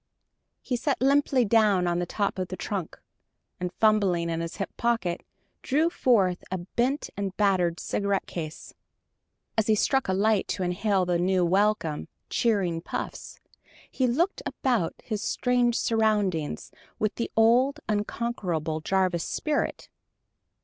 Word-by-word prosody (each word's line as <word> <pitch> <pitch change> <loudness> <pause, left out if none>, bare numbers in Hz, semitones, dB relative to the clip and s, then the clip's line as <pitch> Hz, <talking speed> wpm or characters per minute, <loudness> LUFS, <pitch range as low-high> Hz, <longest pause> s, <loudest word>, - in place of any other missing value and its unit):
He 250 - -1
sat 280 +3 -1
limply 270 -1 +3
down 205 -4 +3
on 175 0 0
the 175 - -2
top 200 0 -1
of 185 - -2
the 185 - -6
trunk, 195 -6 -4 0.6
and 180 -1 -3
fumbling 195 -6 +2
in 165 0 -2
his 165 0 -5
hip 195 - -5
pocket 230 -7 0 0.4
drew 310 +5 +1
forth 195 - +2
a 185 - -2
bent 240 - -1
and 195 -1 -4
battered 185 -4 +2
cigarette 200 -1 -1
case. 155 -2 -7 0.9
As 215 - +1
he 220 - +4
struck 265 +5 +1
a 190 - +1
light 205 +1 +2
to 190 - -2
inhale 190 +2 +1
a 175 -1 +1
few 180 0 +2
welcome, 190 -4 +1 0.2
cheering 190 -8 +1
puffs, - - -6 0.5
he 260 - +1
looked 335 +11 0
about 240 -11 -1
his 215 -3 -3
strange 245 -1 +1
surroundings 210 -8 0 0.3
with 215 -1 0
the 235 - -3
old, 250 +6 +4
unconquerable 205 -7 -2
Jarvis 185 -1 +1
spirit. 305 -1 -2
200 Hz, 140 wpm, -27 LUFS, 180-235 Hz, 0.9 s, he